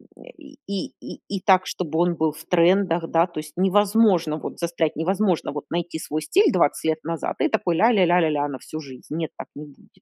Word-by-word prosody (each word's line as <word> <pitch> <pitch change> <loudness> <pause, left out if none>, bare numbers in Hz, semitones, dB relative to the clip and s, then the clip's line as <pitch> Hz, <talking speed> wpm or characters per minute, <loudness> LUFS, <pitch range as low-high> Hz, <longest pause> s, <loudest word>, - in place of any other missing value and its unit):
э, - - -17 0.2
и 290 -3 -15
и 200 -1 -4
и - - -9
и 195 -1 -3
так, 185 -1 +3
чтобы 160 -2 -3
он 175 0 +2
был 160 -1 +1
в 155 +2 -12
трендах, 175 -1 +2
да, 165 +2 +3
то 170 -3 -7
есть 155 -1 -9
невозможно 195 -4 +3
вот - - -7
застрять, 170 -2 -1
невозможно 185 +1 0
вот 145 0 -6
найти 170 -1 -3
свой 155 0 -4
стиль 390 - +3
20 165 -5 +1
лет 160 0 0
назад 165 0 -3
и - - +4
такой 170 -2 0
ля 230 +7 +4
ля 195 -5 +4
ля 175 +1 +4
ля 160 -2 +2
ля, 145 -1 0
на 135 -2 -6
всю 155 - -8
жизнь. 130 -4 -11
Нет, 160 -1 -2
так - - -8
не 150 +1 -8
будет. 145 - -19
170 Hz, 235 wpm, -23 LUFS, 155-190 Hz, 0.2 s, и